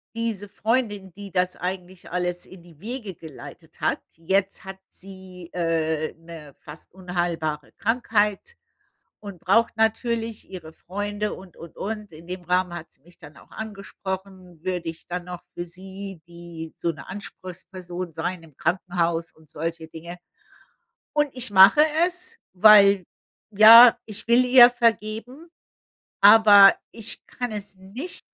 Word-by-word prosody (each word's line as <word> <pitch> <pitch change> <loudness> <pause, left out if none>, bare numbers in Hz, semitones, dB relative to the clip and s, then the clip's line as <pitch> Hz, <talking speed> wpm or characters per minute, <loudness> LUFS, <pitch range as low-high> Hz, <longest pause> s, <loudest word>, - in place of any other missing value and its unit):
diese 225 -3 -3
Freundin, 210 -2 -2
die 200 +1 -11
das 180 +1 0
eigentlich 180 0 -7
alles 180 0 -3
in 185 -1 -15
die 170 -3 -19
Wege 215 -1 -7
geleitet 155 -3 -13
hat - - 0 0.2
jetzt 190 +4 -1
hat 190 0 -9
sie, 185 -2 -13
äh, 160 -2 -1
'ne 165 -3 -13
fast 150 +2 -14
unheilbare 175 -5 -3
Krankheit 225 - -1 0.6
und 200 -4 -10
braucht 230 +8 +2
natürlich 225 0 -1
ihre 170 -4 -9
Freunde 205 +4 -4
und 185 -2 -15
und 165 -1 -12
und. 210 -1 -6
In 160 +2 -14
dem 180 0 -7
Rahmen 180 0 0
hat 170 -1 -9
sie - - -24
mich 175 +4 -22
dann 150 -2 -15
auch - - -19
angesprochen, 190 -4 -8
würde 180 -2 -3
ich 165 - -11
dann 175 0 -5
noch 180 -1 -8
für 175 - -5
sie, 190 +1 -10
die 170 -2 -10
so 170 - -1
'ne 160 - -13
Anspruchsperson 185 -2 -8
sein 165 +2 -4
im 155 -4 -18
Krankenhaus 170 -2 -1
und 160 -1 -24
solche 165 +1 -5
Dinge. 170 +2 -10 1.0
Und 295 -1 +1
ich 255 -2 0
mache 195 +6 +7 0.3
es, 365 +6 -9
weil 200 -1 +6 0.5
ja, 225 +3 +9
ich 215 0 -7
will 240 +2 +5
ihr 250 -1 +8
vergeben, 235 +5 -2 0.7
aber 205 -1 +8 0.2
ich 230 -1 -4
kann 245 -2 -5
es 205 -1 -8
nicht. 210 - -9
190 Hz, 140 wpm, -23 LUFS, 170-215 Hz, 1.0 s, ja